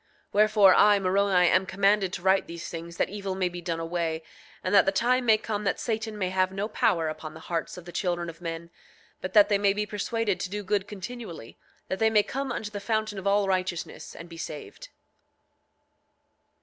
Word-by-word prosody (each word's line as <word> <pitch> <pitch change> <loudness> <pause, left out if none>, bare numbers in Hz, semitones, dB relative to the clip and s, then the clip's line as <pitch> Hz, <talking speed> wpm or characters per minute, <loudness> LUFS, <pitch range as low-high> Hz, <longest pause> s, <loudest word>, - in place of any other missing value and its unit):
8:26 - - -40
Wherefore, 210 -2 +6
I, 205 +2 +6
Moroni, 190 -1 +3
am 185 +1 +3
commanded 195 0 +2
to 175 - -5
write 190 +1 +3
these 170 0 -7
things 170 0 -7
that - - +1
evil 195 -2 -4
may 185 -1 0
be 175 0 -7
done 165 -1 -3
away, 165 -1 -2 0.4
and 185 - -1
that 200 - +6
the - - +4
time 245 +5 +1
may 220 -1 +6
come 210 -1 -4
that 195 - 0
Satan 220 -2 -3
may 185 -3 -1
have 185 0 +1
no 195 +2 -2
power 210 -7 +1
upon 155 0 -6
the - - -9
hearts 170 +1 -4
of 180 - -10
the 175 - -9
children 175 -2 -1
of 165 +1 -9
men, 165 0 -6 0.5
but 185 0 -5
that 210 -2 +7
they 205 -2 +2
may 200 -1 +3
be 210 +1 -1
persuaded 210 0 -2
to 185 - -3
do 205 +1 -4
good 200 0 0
continually, 205 - -8 0.3
that 190 - -3
they 220 - +4
may 215 -2 +4
come 270 +3 -4
unto 215 -3 -4
the 205 - -5
fountain 215 -1 -1
of 190 - -4
all 200 0 +3
righteousness 185 -2 -3
and 170 - -9
be 165 -1 -11
saved. 165 - -8
195 Hz, 215 wpm, -27 LUFS, 175-210 Hz, 0.5 s, that